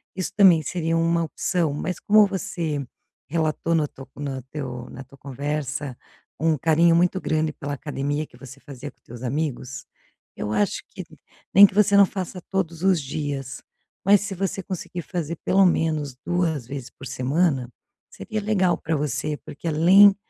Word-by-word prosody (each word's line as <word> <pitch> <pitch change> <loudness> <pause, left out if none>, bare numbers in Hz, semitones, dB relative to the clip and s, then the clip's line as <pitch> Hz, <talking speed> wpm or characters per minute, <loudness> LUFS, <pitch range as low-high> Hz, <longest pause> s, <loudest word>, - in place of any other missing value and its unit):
isso 185 -1 -3
também 185 -6 +7
seria 165 +1 -1
uma 165 0 +2
opção. 165 0 -1
Mas, 180 +5 -3
como 210 0 +6
você 160 -6 -3 0.4
relatou 160 +1 0
no 155 -2 +2
tu 135 -1 -12
no 140 -2 -4
teu 125 -5 -5
na 135 - -8
tua 135 +1 -18
conversa 140 0 -4 0.4
um 160 0 +2
carinho 165 +3 +4
muito 180 +2 +2
grande 155 0 0
pela 145 0 -5
academia 145 +1 -3
que - - -19
você 135 0 -12
fazia 140 0 -9
com - - -45
os - - -55
teus 120 +1 -10
amigos, 130 -2 -3 0.5
eu 105 - -3
acho 105 -1 0
que - - -8 0.5
nem 200 +2 +10
que - - -12
você 205 -1 +5
não 200 - +8
faça 185 -1 -5
todos 170 -3 -2
os 190 -4 +3
dias, 135 -2 -4 0.4
mas 200 0 +6
se 200 -1 -4
você 195 +1 -2
conseguir 180 -1 -5
fazer 170 -2 -4
pelo 195 +1 +5
menos 155 -6 +1
2 165 -8 0
vezes 135 -2 -6
por 135 - -10
semana, 135 0 +1 0.4
seria 220 -2 -5
legal 190 -4 +2
para 160 - -2
você, 150 +1 -2
porque, 145 - -7
além 185 +6 +7
155 Hz, 170 wpm, -24 LUFS, 140-180 Hz, 0.5 s, nem